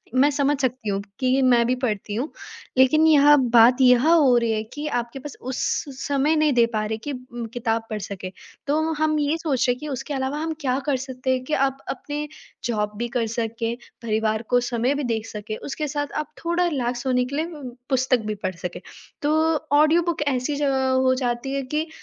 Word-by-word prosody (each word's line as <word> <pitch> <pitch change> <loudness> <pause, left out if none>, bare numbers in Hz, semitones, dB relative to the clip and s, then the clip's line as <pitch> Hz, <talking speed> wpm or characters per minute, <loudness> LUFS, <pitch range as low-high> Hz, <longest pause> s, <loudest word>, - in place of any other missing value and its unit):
मैं 270 +3 +5
समझ 285 0 +1
सकती 255 -4 -1
हूँ 195 -1 0
क्योंकि 255 +6 0
मैं 245 -2 +4
भी 250 - +2
पढ़ती 210 -2 -3
हूँ, 260 +8 -3 0.5
लेकिन 310 +5 +5
यहाँ 295 -1 +7 0.2
बात 240 +3 +6
यह 250 +2 +5
हो 290 -7 +5
रही 235 -1 +1
है 215 -1 0
कि 295 +1 -5
आपके 240 +3 -6 0.2
उस 260 +1 -4 0.3
स - - -8
समय 285 +2 +2
नहीं 305 -2 +3
दे 240 -2 +5
पा 215 -1 0
रहे 220 +1 -2
कि 285 +6 -6
उम, 250 -3 -7
किताब 225 -1 -1
पढ़ 215 - -3
सकें। 190 -1 -6 0.4
तो 315 +3 +1
हम 310 0 +2
ये 295 +2 +1
सोच 290 -6 0
रहे 245 - +4
हैं 245 - -11
कि 300 - -6
उसके 280 +1 -4
अलावा 265 +1 -2
हम 320 0 -2
क्या 260 -2 0
कर 285 -3 +1
सकते 260 0 -2
हैं 255 0 -2
कि 305 - -5
आप 270 -1 +1
अपने 295 +2 -4 0.4
जॉब 210 -3 -1
भी 240 +2 -2
कर 230 -2 0
सकें, 230 0 -2 0.3
परिवार 220 -1 0
को 245 - +4
समय 245 +3 +1
भी 290 - -2
दे 230 -3 -1
सकें, 215 0 -5
उसके 300 +2 -4
साथ 290 0 -3
आप - - -25
थोड़ा 345 +1 +2
रिलैक्स 245 -5 -2
होने 250 -1 +2
के 270 +3 -5
लिए 310 +2 0
ब 290 -8 -9
पुस्तक 260 -1 +2
भी 215 - -2
पढ़ 185 -1 -2
सकें। 175 +1 -6 0.4
तो 295 +1 +1 0.5
ऑडियो 310 +3 +5
बुक 340 -3 -2
ऐसी 265 +1 0
जगह 270 -2 +1
हो 260 0 +3
जाती 240 +3 -2
है 275 - 0
कि 310 +2 0
260 Hz, 215 wpm, -23 LUFS, 235-290 Hz, 0.5 s, यहाँ